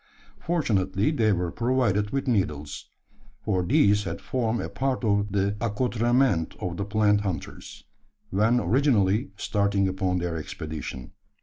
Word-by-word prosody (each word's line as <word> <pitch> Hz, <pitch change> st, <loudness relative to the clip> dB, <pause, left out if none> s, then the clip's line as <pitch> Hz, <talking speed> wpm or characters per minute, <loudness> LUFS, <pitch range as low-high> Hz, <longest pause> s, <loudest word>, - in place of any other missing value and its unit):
Fortunately, 105 Hz, -, 0 dB
they 115 Hz, -8 st, +2 dB
were 90 Hz, -3 st, -1 dB
provided 115 Hz, -3 st, +1 dB
with 135 Hz, +4 st, -2 dB
needles: 75 Hz, -, -2 dB, 0.6 s
for 95 Hz, -3 st, +1 dB
these 105 Hz, -, +3 dB
had -, -, -4 dB
formed 120 Hz, -3 st, -1 dB
a -, -, -3 dB
part 130 Hz, -1 st, -2 dB
of 100 Hz, -2 st, +1 dB
the 100 Hz, +1 st, 0 dB
accoutrement 120 Hz, -3 st, +1 dB
of 85 Hz, -1 st, -4 dB
the 100 Hz, -, -2 dB
plant 105 Hz, 0 st, +2 dB
hunters 95 Hz, -7 st, -6 dB, 0.5 s
when 110 Hz, +5 st, +3 dB
originally 110 Hz, -, +2 dB
starting 100 Hz, -1 st, +1 dB
upon 95 Hz, -1 st, -1 dB
their 85 Hz, -2 st, -2 dB
expedition. 75 Hz, -4 st, -6 dB
105 Hz, 130 wpm, -26 LUFS, 95-120 Hz, 0.6 s, these